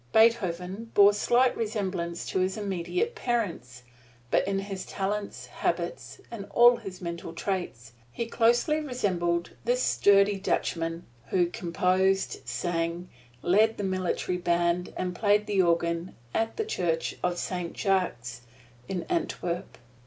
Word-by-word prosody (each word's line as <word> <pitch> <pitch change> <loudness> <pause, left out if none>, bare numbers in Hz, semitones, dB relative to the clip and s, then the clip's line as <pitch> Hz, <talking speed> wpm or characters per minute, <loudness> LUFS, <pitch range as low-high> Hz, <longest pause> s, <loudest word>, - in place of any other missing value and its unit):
Beethoven 215 -2 +2
bore 205 0 +7
slight 240 +5 +3
resemblance 190 -6 -3
to - - 0
his 185 +2 0
immediate 210 - -2
parents, 175 - -3 0.5
but - - +2
in 195 0 0
his 195 -1 -4
talent, 200 +1 -4
habits - - -2
and 205 -4 -7
all 240 +1 +8
of - - -13
his 190 -4 -8
mental 170 -1 -5
traits, 170 - -4 0.2
he 235 - -3
closely 240 +7 +2
resembled 180 - -1
this 245 +2 +1
sturdy 200 0 +4
Dutchman 165 -3 -1 0.2
who 180 -2 +2
composed, 185 +2 0
sang, 170 0 -2 0.3
led 215 +5 +4
the 205 - -3
military 185 -1 -1
band, 175 0 +1
and 180 -1 -2
played 210 +1 +3
the 205 -2 +2
organ 170 0 0 0.2
at 225 0 -1
the 440 - -1
Church 170 - -1
of 180 -1 0
Saint 180 -1 -4
Jacques 150 - -1 0.5
in 185 -2 -3
Antwerp. 180 - -3
190 Hz, 130 wpm, -28 LUFS, 175-215 Hz, 0.5 s, all